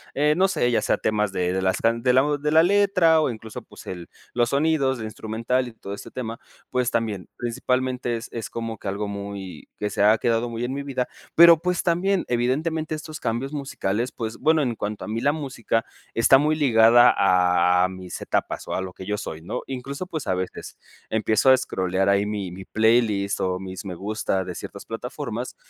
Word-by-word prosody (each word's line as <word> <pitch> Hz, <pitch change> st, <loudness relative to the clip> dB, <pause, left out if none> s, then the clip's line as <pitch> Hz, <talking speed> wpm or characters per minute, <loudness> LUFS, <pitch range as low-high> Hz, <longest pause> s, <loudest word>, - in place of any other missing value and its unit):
eh, 150 Hz, +2 st, +3 dB
no 190 Hz, +1 st, +4 dB
sé, 120 Hz, -9 st, +1 dB
ya -, -, +2 dB
sea -, -, +1 dB
temas 105 Hz, -2 st, 0 dB
de 90 Hz, 0 st, 0 dB
de 95 Hz, -, -1 dB
las 95 Hz, 0 st, +1 dB
can 115 Hz, +1 st, +1 dB
de 125 Hz, -1 st, +4 dB
la 130 Hz, +1 st, +5 dB
de 150 Hz, +1 st, -1 dB
la 160 Hz, +1 st, +6 dB
letra 185 Hz, -4 st, +4 dB
o 150 Hz, -, +1 dB
incluso 110 Hz, -2 st, -7 dB
pues -, -, -15 dB
el 90 Hz, -2 st, -7 dB, 0.2 s
los 120 Hz, -1 st, +2 dB
sonidos 140 Hz, -2 st, +1 dB
de 110 Hz, -, -4 dB
instrumental 115 Hz, +4 st, -2 dB
y -, -, -8 dB
todo 100 Hz, -3 st, -8 dB
este 100 Hz, -, -9 dB
tema, 115 Hz, -2 st, -5 dB, 0.3 s
pues 125 Hz, -1 st, 0 dB
también, 110 Hz, -6 st, -2 dB
principalmente 125 Hz, 0 st, -1 dB
es 115 Hz, -, -7 dB
es 115 Hz, -2 st, -5 dB
como 115 Hz, -1 st, -5 dB
que -, -, -8 dB
algo 100 Hz, +1 st, -3 dB
muy, 100 Hz, -2 st, -7 dB
que 105 Hz, 0 st, -1 dB
se 100 Hz, -, 0 dB
ha 110 Hz, +2 st, +6 dB
quedado 115 Hz, 0 st, +1 dB
muy 115 Hz, +1 st, -3 dB
en 130 Hz, -, -3 dB
mi 140 Hz, 0 st, -4 dB
vida, 130 Hz, -3 st, -2 dB, 0.3 s
pero 170 Hz, -1 st, +8 dB
pues 180 Hz, -1 st, 0 dB
también 180 Hz, +2 st, +1 dB
evidentemente 155 Hz, +6 st, 0 dB
estos 155 Hz, 0 st, -8 dB
cambios 120 Hz, +5 st, -2 dB
musicales 125 Hz, -5 st, -2 dB
pues 110 Hz, -2 st, -5 dB
bueno, 160 Hz, 0 st, +3 dB
en 120 Hz, -3 st, -1 dB
cuanto 105 Hz, 0 st, -4 dB
a -, -, -7 dB
mí 115 Hz, +2 st, -2 dB
la 145 Hz, -, +3 dB
música 130 Hz, -6 st, -2 dB, 0.3 s
está 115 Hz, +4 st, +6 dB
muy 155 Hz, +1 st, +2 dB
ligada 120 Hz, -4 st, +6 dB, 0.7 s
a -, -, +3 dB
mis 95 Hz, -1 st, -8 dB
etapas -, -, -2 dB
o -, -, -3 dB
a 95 Hz, -, -1 dB
lo 95 Hz, -1 st, -6 dB
que 95 Hz, -, -10 dB
yo 105 Hz, +1 st, -2 dB
soy 80 Hz, -4 st, -6 dB
¿no? 85 Hz, -, -4 dB
Incluso 135 Hz, +6 st, -5 dB
pues 155 Hz, -5 st, -5 dB
a -, -, +2 dB
veces, 95 Hz, 0 st, -5 dB, 0.3 s
empiezo 110 Hz, +3 st, +2 dB
a -, -, +8 dB
escrolear 95 Hz, -4 st, -1 dB
ahí 100 Hz, +1 st, +3 dB
mi 105 Hz, -4 st, -3 dB
mi 95 Hz, +1 st, -9 dB
playlist 110 Hz, -3 st, +2 dB
o 90 Hz, 0 st, -1 dB
mis 95 Hz, 0 st, -7 dB
me 90 Hz, -2 st, -5 dB
gusta 100 Hz, -1 st, -2 dB
de 90 Hz, -2 st, -6 dB
ciertas -, -, -8 dB
plataformas 125 Hz, +1 st, -5 dB
115 Hz, 210 wpm, -24 LUFS, 105-135 Hz, 0.7 s, pero